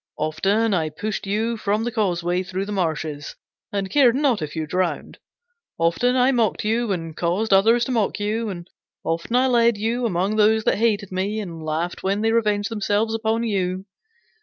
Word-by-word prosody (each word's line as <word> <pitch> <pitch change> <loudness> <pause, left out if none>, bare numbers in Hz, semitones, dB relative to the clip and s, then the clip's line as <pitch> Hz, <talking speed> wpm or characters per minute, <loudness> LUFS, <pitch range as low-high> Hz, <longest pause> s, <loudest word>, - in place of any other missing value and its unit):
Often 195 +8 +1
I 160 -4 0
pushed 200 +6 -4
you 225 +3 -1
from 210 +1 0
the 240 - -2
causeway 180 -5 0
through 185 +1 -4
the 210 - -6
marshes, 155 -6 -3 0.4
and 200 -1 -2
cared 255 -5 +5
not 265 - +1
if 155 0 -5
you 160 -1 -2
drowned. 180 +2 -2 0.6
Often 170 +10 +2
I 255 +1 +4
mocked 230 -5 0
you, 225 0 0
and 165 -4 -4
caused 185 +6 0
others 225 +5 +4
to 260 - -3
mock 220 -4 0
you. 215 +2 -1
And 175 -3 -7 0.4
often 165 +8 -2
I 255 +1 +4
led 235 -3 +3
you 230 +3 0
among 195 +2 -1
those 220 +1 +4
that - - +1
hated 210 -4 +1
me, 195 +4 -2
and 170 -6 -6
laughed 160 +3 -3
when 195 +2 0
they 225 0 +2
revenged 210 -3 +1
themselves 210 +1 0
upon 225 +1 0
you. 190 -4 -1
205 Hz, 185 wpm, -22 LUFS, 180-225 Hz, 0.6 s, cared